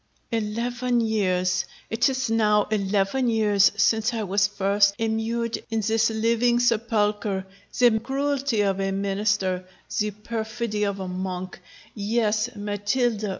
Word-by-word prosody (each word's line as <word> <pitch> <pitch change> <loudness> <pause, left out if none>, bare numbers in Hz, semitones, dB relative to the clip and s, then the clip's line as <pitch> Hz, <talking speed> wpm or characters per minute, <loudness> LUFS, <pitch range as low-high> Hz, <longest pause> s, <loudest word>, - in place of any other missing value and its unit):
_ - - -8
ROGERO. 225 -2 0
Eleven 245 +2 -1
years! 185 -5 +1 0.3
it 235 +5 +2
is 260 -1 -1
now 210 -2 +3
eleven 205 +4 +1
years 210 -3 +4
since 220 +2 +2
I 220 - -2
was 195 0 +2
first 200 0 +2
immured 225 +1 -1
in 225 -1 -1
this 225 +2 +2
living 230 +2 +2
sepulchre; 215 -4 0 0.3
the 240 -3 +4
cruelty 275 -1 -1
of 195 -1 0
a 195 0 0
Minister 195 -1 0 0.4
the 210 0 +1
perfidy 220 0 -3
of 200 -1 -2
a 190 - -4
Monk 185 0 -5 0.3
yes, 215 +1 0
Matilda! 205 +2 -1
215 Hz, 135 wpm, -24 LUFS, 200-230 Hz, 0.4 s, years